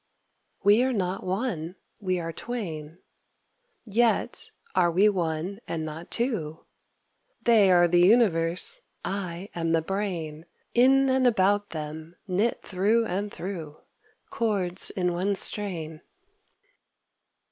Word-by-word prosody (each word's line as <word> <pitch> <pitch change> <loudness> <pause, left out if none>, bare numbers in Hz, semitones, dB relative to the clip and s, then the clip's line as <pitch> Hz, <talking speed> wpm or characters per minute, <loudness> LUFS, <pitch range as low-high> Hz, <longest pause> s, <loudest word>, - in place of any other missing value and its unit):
We 205 +3 +5
are 260 0 +1
not 190 -3 -2
one, 185 -3 -3 0.3
we 185 -2 0
are 165 -1 -4
twain, 165 -9 -6 0.9
Yet 230 +2 +1 0.2
are 180 -2 +3
we 190 +5 +4
one 175 +1 -2
and 160 -1 -3
not 155 +2 -7
two. 215 - -2 0.8
They 220 -5 +5
are 175 -1 +6
the 175 +1 +3
universe, 185 - +3 0.2
I 190 -1 -4
am 165 -1 -1
the 165 - +3
brain, 170 -5 -4 0.3
In 270 +3 +5
and 260 -1 +3
about 205 -2 +2
them, 155 +1 -7
knit 200 +6 0
through 210 +5 +1
and 200 +1 -3
through, 165 -5 -6 0.5
Chords 195 -5 +1
in 180 -2 -1
one 190 +3 0
strain. 170 -7 -3
185 Hz, 115 wpm, -26 LUFS, 165-210 Hz, 0.9 s, are